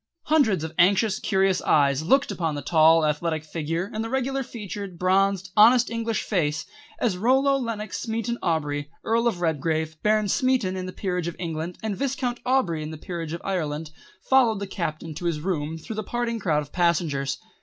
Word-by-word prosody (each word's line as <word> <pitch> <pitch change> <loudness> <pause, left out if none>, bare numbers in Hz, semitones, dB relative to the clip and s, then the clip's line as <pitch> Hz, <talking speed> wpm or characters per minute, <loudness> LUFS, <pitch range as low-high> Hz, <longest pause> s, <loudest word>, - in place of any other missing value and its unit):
Hundreds 270 - +2
of 160 - -5
anxious, 200 +3 +4
curious 190 -2 +1
eyes 140 -1 +3
looked 270 - +3
upon 165 -4 -2
the 145 - -5
tall 160 +1 +5
athletic 155 +1 -1
figure 165 +3 -3
and 220 +1 -2
the 225 - -4
regular 265 +1 -1
featured, 200 -6 -7
bronzed, 190 +1 +1
honest 235 +3 +6
English 230 -1 -1
face 155 -6 -1 0.3
as 185 -6 0
Rollo 265 +5 +3
Lenox 230 -5 -3
Smeaton 230 +1 -2
Aubrey, 145 -3 -1
Earl 230 +1 +2
of 190 -7 -1
Redgrave, 160 0 -1
Baron 215 0 +2
Smeaton 250 -4 +1
in 185 0 -4
the - - -5
Peerage 180 -3 -2
of 170 - -4
England, 165 0 -4
and 215 -2 -2
Viscount 255 -1 -2
Aubrey 220 -12 +1
in 155 - -5
the 160 - -7
Peerage 165 -1 -5
of 170 - -6
Ireland, 155 -5 -2 0.4
followed 250 -5 +4
the 200 - -4
Captain 165 -4 -4
to 175 - -7
his 165 -3 0
room 160 -2 -2
through 210 +7 -7
the 215 - -2
parting 235 +1 -2
crowd 155 -6 +1
of 145 - -15
passengers. 155 -6 0
185 Hz, 185 wpm, -25 LUFS, 160-225 Hz, 0.4 s, honest